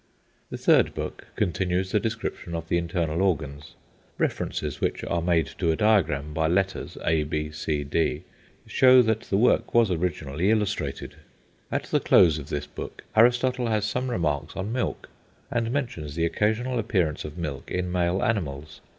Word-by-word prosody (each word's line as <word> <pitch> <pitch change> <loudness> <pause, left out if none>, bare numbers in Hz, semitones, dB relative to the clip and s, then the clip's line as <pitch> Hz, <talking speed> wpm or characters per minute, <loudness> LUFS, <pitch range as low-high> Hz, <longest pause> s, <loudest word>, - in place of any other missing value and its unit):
The - - -5
third - - +3
book - - -6
continues 90 +1 0
the 105 - +3
description 110 -6 -4
of 80 0 -5
the 85 - +2
internal 85 -1 -1
organs. 75 -6 -2 0.4
References 75 -3 -2
which - - -1
are 85 - -1
made 85 -1 +2
to 85 - +1
a - - +1
diagram 80 -9 +2
by 80 +1 +1
letters, 95 +3 -1
a, 80 -1 +3
b, 75 0 -3
c, 75 -1 -2
d, 75 +4 0 0.4
show 130 -1 +6
that 110 -1 +1
the 100 - -2
work 120 +2 +2
was 115 -4 +5
originally 85 -1 -1
illustrated. 100 -11 -1 0.5
At - - -1
the - - 0
close 80 -3 +5
of 70 - -9
this 75 0 -3
book 75 - -8
Aristotle 125 +2 +3
has 110 -2 +1
some 125 +4 -2
remarks 75 - -1
on 95 +3 -3
milk, 125 - -2 0.4
and 115 -1 0
mentions 115 - -3
the 85 0 +1
occasional 110 +7 0
appearance 90 -8 0
of 75 +2 -8
milk 75 -6 -5
in 90 0 -2
male 90 +1 +1
animals. 80 -8 -2
90 Hz, 165 wpm, -26 LUFS, 75-110 Hz, 0.5 s, show